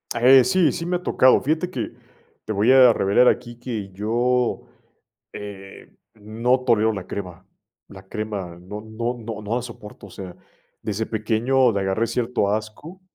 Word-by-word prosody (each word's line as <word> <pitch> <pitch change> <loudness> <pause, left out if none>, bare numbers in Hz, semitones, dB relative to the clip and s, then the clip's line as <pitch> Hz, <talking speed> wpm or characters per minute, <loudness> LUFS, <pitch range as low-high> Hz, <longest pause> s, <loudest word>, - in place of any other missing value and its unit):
Eh, 130 +2 +6
sí, 185 -4 +3
sí 165 - -5
me 180 +1 -1
ha 180 - -14
tocado, 130 -6 +4
fíjate 160 +5 -1
que 185 - -4 0.5
te 110 - -3
voy 105 +5 +3
a 130 -3 +7
revelar 105 +6 +3
aquí 120 -1 0
que 110 -5 -5
yo, 120 +5 0 0.7
eh, 100 -1 -10 0.3
no 115 +4 0
tolero 110 -3 +3
la 95 -4 -6
crema, 90 -2 -7 0.4
la 95 -2 -13
crema 105 -6 -5
no 105 +4 -8
no 115 +3 -4
no 110 -2 -7
no 105 +2 -3
la 125 - -1
soporto. 105 -4 -11
O - - -15
sea, 90 -1 -9 0.5
desde 110 +1 -3
pequeño 115 +4 +1
le 100 - -1
agarré 95 +4 0
cierto 115 -3 -1
asco 110 - -5
110 Hz, 165 wpm, -22 LUFS, 105-125 Hz, 0.7 s, a